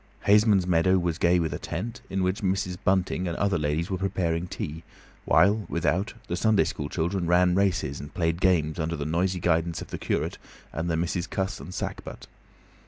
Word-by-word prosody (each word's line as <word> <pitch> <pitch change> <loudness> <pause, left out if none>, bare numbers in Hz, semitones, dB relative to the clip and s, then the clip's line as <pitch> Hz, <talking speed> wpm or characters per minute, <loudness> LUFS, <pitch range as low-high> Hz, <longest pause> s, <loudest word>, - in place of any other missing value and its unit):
Haysman's 105 -2 +5
meadow 90 +1 +3
was 85 -2 -1
gay 90 +1 +4
with 80 -2 -1
a - - -4
tent, 115 +9 -5
in 95 -1 -1
which 95 +4 0
Mrs. 95 -2 0
Bunting 95 -1 +1
and 85 - -3
other 100 -4 +1
ladies 75 +4 -1
were 95 - -1
preparing 90 -3 -1
tea, 80 -2 -5 0.4
while, 100 0 +3
without, 95 +6 0
the 85 - -2
Sunday 105 -1 +3
school 75 -2 -4
children 85 +1 -1
ran 90 +1 +4
races 90 -7 0
and 70 +1 -8
played 85 0 -1
games 80 -4 +2
under 80 +1 -1
the 75 - -4
noisy 90 +4 0
guidance 85 -1 +1
of - - -8
the - - -5
curate - - -2 0.3
and 80 +2 -2
the 80 - +1
Misses 85 +1 -1
Cuss 95 0 -2
and 70 +7 -9
Sackbut. - - -6
90 Hz, 190 wpm, -26 LUFS, 85-95 Hz, 0.4 s, Haysman's